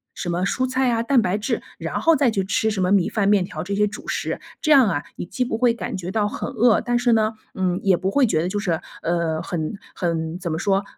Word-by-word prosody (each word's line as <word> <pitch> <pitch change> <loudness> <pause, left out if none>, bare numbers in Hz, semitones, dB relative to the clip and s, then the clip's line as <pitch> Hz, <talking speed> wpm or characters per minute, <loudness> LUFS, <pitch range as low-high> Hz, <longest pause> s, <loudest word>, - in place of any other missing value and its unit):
什 - - -5
么 175 +1 -1
蔬 255 +6 0
菜 255 0 +1
啊、 230 -1 +1
蛋 245 +1 +3
白 190 -1 0
质， 210 - -2 0.2
然 - - -3
后 330 - +5
再 275 -3 +3
去 200 -4 0
吃 205 +3 0
什 200 -3 -2
么 180 - +1
米 195 -4 +4
饭、 205 -3 0
面 200 -3 +3
条， 155 -3 -6
这 195 +3 -4
些 210 +1 +3
主 200 - -9
食。 - - -2 0.2
这 310 - -1
样 265 -7 +7
啊， 145 -6 -1
你 - - -5
既 250 +7 -2
不 225 - -2
会 240 0 +3
感 235 - -5
觉 185 -1 -5
到 210 0 +1
很 - - -4
饿， 235 -2 +3
但 240 0 0
是 240 -1 +3
呢， 220 0 +2 0.2
嗯， 185 -1 0
也 195 -2 +4
不 190 +2 -2
会 280 +2 +4
觉 160 -9 +1
得 175 - -1
就 205 +2 -2
是， 175 -6 -1 0.2
呃， 165 -2 -1
很 160 0 -3 0.2
很 165 -1 -2
怎 175 -3 -3
么 160 - -2
说？ 195 +1 +1
200 Hz, 285 characters per minute, -22 LUFS, 180-230 Hz, 0.2 s, 样